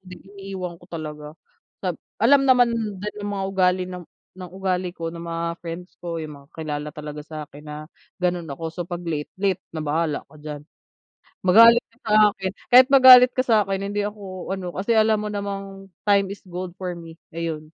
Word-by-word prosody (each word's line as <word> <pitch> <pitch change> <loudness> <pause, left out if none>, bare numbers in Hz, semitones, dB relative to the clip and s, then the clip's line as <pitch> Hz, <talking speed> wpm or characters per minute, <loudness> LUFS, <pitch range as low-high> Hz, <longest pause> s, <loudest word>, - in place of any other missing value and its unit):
iniiwan 190 -2 -8
ko - - -16
talaga, 150 -2 -7 0.6
sab 180 -3 -1 0.2
alam 275 +4 +5
naman 245 -2 +5 0.3
din 210 +1 -5
ng 205 - -4
mga 195 -1 -2
ugali 185 -1 +2
ng 180 -1 -7 0.3
ugali 185 0 -3
ko 165 -1 -4
ng 170 - -9
mga 170 0 -3
friends 175 +2 -8
ko 170 -2 -5
'yung 145 -3 -10
kakilala 150 -2 -5
talaga 150 0 -7
sa 155 -1 -6
akin 145 +1 -13
na 150 0 -6 0.5
gano'n 175 -2 0
ako 165 - -9
so 175 - -9
'pag 175 -1 -5
late, 155 -3 -4
late 190 -1 0 0.2
na 155 - -3
bahala 155 0 -1
ka 155 - -16
diyan. 150 -1 -7 0.8
Magalit 230 +5 +8
ka - - -28
sa 210 - 0 0.2
akin 190 -1 -4 0.2
kahit 255 +1 +8
magalit 255 -1 +9
ka 255 - +1
sa'kin 200 -4 +2
hindi 205 0 -1
ako 195 -3 -7
ano 185 -2 -4
kasi 200 +5 0
alam 220 0 +4
mo 210 - -3
namang 195 -1 -5 0.2
time 200 -1 +3
is - - -14
gold 180 0 -6
for 180 -2 -4
me 165 -1 -11 0.2
ayun. 165 -2 -4
180 Hz, 180 wpm, -23 LUFS, 165-200 Hz, 0.8 s, magalit